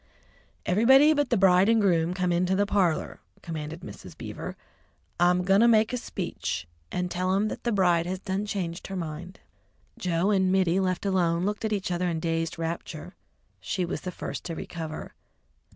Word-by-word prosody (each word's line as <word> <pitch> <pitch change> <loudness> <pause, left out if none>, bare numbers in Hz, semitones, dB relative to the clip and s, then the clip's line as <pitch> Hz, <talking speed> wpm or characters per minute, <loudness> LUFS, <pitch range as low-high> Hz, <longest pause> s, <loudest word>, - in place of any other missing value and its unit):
"Everybody 265 +10 +6
but 290 -3 0
the 235 - +2
bride 190 +1 +5
and 230 0 +4
groom 175 -3 +2
come 180 -1 0
into 180 +2 +2
the 205 +1 +2
parlour," 185 -6 0 0.2
commanded 160 0 -6
Mrs. - - -10
Beaver. - - -7 0.6
"I'm 180 +1 +4
a - - -3
going 195 +3 +4
to 235 - +6
make 220 0 +4
a - - +1
speech, 85 - -4 0.2
and 180 0 -2
tell 185 +1 0
'em 210 +2 +1
that - - -7
the 240 - +1
bride 175 -4 +3
has 185 +1 -2
done 190 +2 -3
changed 180 -4 -4
her 195 - -5
mind." 175 +1 -6 0.6
Joe 180 +2 +1
and 190 -2 +3
Mittie, 185 -1 +3
left 185 0 -1
alone, 175 -3 +1
looked 210 +2 -2
at 220 - -1
each 195 -3 -1
other 180 +1 0
in 165 -2 -2
dazed 165 0 -2
rapture. 165 +1 -5 0.4
She 185 - -2
was 170 - -4
the 180 - -5
first - - -6
to 165 - -4
recover. 160 -1 -6
180 Hz, 185 wpm, -27 LUFS, 170-195 Hz, 0.6 s, Everybody